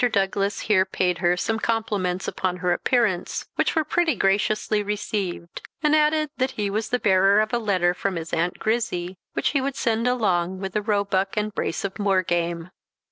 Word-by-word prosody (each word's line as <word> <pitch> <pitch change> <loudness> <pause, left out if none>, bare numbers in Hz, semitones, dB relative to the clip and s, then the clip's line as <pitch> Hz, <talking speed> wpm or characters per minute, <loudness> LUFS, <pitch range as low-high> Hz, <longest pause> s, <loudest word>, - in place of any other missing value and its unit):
Douglas 195 0 0
here 200 -4 +3
paid 185 -2 -1
her 175 0 +2
some 220 +4 -1
compliments 205 -6 -1
upon 185 -1 -2
her 180 -1 +1
appearance, 210 -3 0
which - - 0
were 320 - +3
pretty 320 -1 +1
graciously 210 +2 +1
received; 200 -4 -4 0.2
and 300 0 +4
added 305 -1 +2
that 260 0 +1
he 205 -2 -1
was 215 +2 -2
the 250 - +1
bearer 195 -2 +4
of 215 +1 0
a 240 - +2
letter 185 -5 +1
from 190 +1 -2
his 165 -1 -6
Aunt 170 +2 0
Grizzy, 190 -6 -2
which - - 0
he 280 - +1
would 270 0 -2
send 230 -1 0
along 190 -7 +1
with 190 -1 -5
a 210 - +2
roebuck 200 -2 0
and 210 0 -1
brace 175 - -2
of 200 +2 -5
moor 195 -2 +2
game. 170 0 -2
200 Hz, 190 wpm, -24 LUFS, 180-225 Hz, 0.2 s, and